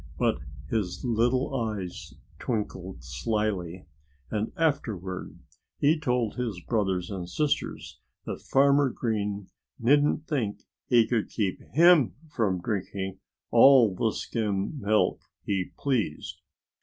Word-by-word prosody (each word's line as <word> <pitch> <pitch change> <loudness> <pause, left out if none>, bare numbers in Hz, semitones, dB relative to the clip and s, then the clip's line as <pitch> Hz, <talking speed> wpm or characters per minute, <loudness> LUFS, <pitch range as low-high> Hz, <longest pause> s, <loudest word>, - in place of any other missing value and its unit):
But - - +1 0.3
his 90 - -2
little 125 +3 +1
eyes 105 -7 -4 0.2
twinkled 95 - -4
slyly. 90 - -2 0.5
And 110 0 -1
afterward 110 - -2 0.4
he 155 +3 +3
told 125 -6 0
his 115 -7 -2
brothers 95 -3 -1
and 90 -3 -5
sisters 150 - -2 0.3
that - - -5
Farmer 140 0 +4
Green 105 -5 -2 0.3
needn't 145 +5 +3
think 120 -11 -2 0.2
he 120 -3 +5
could 115 -1 -1
keep 100 -5 -2
him 170 -4 +6 0.2
from 100 -9 0
drinking 95 -1 -3 0.3
all 130 -7 +7
the 110 +4 0
skim 105 +6 -2
milk 105 0 +2 0.2
he 95 -2 -1
pleased. 120 - -2
110 Hz, 110 wpm, -27 LUFS, 95-130 Hz, 0.5 s, all